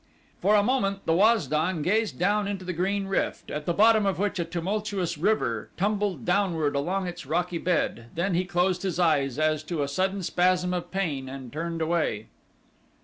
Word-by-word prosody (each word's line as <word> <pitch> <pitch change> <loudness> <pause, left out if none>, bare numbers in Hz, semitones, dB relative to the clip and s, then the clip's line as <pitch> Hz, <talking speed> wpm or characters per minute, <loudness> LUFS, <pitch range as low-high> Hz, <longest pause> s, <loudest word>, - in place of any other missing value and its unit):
For 210 +2 +4
a 205 - +5
moment 200 -5 0
the 165 - +2
Waz 210 +1 +4
don 155 +3 0
gazed 215 +5 +1
down 205 +3 +1
into 195 -2 -4
the 180 - -3
green 195 +4 -1
rift 195 0 -2
at 150 0 -5
the - - +2
bottom 220 0 +5
of 190 -4 0
which 205 0 -1
a 170 - 0
tumultuous 185 0 -2
river 150 - 0
tumbled 200 - -1
downward 175 -6 +1
along 185 +7 -1
its 175 -4 -7
rocky 175 +2 -1
bed, 160 -10 -1
then 175 +3 0
he 175 +2 +2
closed 180 0 +1
his 185 -4 -2
eyes 140 -6 +2
as 155 -1 +1
to 160 -3 -2
a - - -2
sudden 190 +6 -1
spasm 180 +1 +1
of 175 -1 -3
pain 150 -9 -2
and 130 -3 -8
turned 165 +1 -3
away. 155 -10 -1
180 Hz, 190 wpm, -26 LUFS, 160-195 Hz, -, a